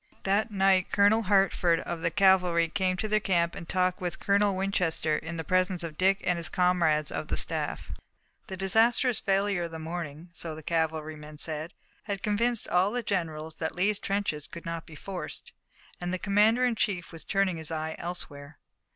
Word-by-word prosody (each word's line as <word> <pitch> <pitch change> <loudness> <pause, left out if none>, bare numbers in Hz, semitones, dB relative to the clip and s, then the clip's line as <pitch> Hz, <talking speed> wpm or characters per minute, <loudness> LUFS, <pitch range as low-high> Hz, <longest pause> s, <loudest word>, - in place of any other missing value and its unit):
That 200 +3 +1
night 195 -2 +3
Colonel 205 +2 +4
Hertford 195 -4 +3
of 170 -1 -5
the 170 - +1
cavalry 180 -2 +4
came 185 0 0
to 215 - -2
their 215 0 +2
camp 170 -4 +1
and 170 - -9
talked 185 -1 +1
with 175 -1 -3
Colonel 200 0 +2
Winchester 180 -5 0
in 165 +2 -5
the 160 - -3
presence 185 0 +1
of 160 -2 -6
Dick 195 +3 +2
and 180 - +1
his 170 - 0
comrades 170 -4 +2
of - - -4
the - - -2
staff. - - -1 0.6
The 190 - -6
disastrous 225 +5 +3
failure 195 -1 +1
of 170 - -3
the 165 - -6
morning, 160 0 -6
so 160 -1 -4
the 155 - -10
cavalryman 155 -2 -2
said, 155 +3 -4 0.3
had 200 -2 -4
convinced 230 +2 +1
all 180 +2 +3
the 245 +2 -2
generals 160 -6 -2
that 160 - -3
Lee's 200 +3 +1
trenches 195 -7 -2
could 170 - -10
not 165 -1 -5
be 160 - -11
forced, 185 +3 -7 0.5
and 175 0 -2
the 185 - 0
commander 210 +6 +3
in 245 - +2
chief 195 -5 -1
was 165 -2 -8
turning 195 -3 +1
his 160 -2 -5
eye 160 -1 -3
elsewhere. 145 -4 -6
180 Hz, 185 wpm, -28 LUFS, 165-195 Hz, 0.6 s, Colonel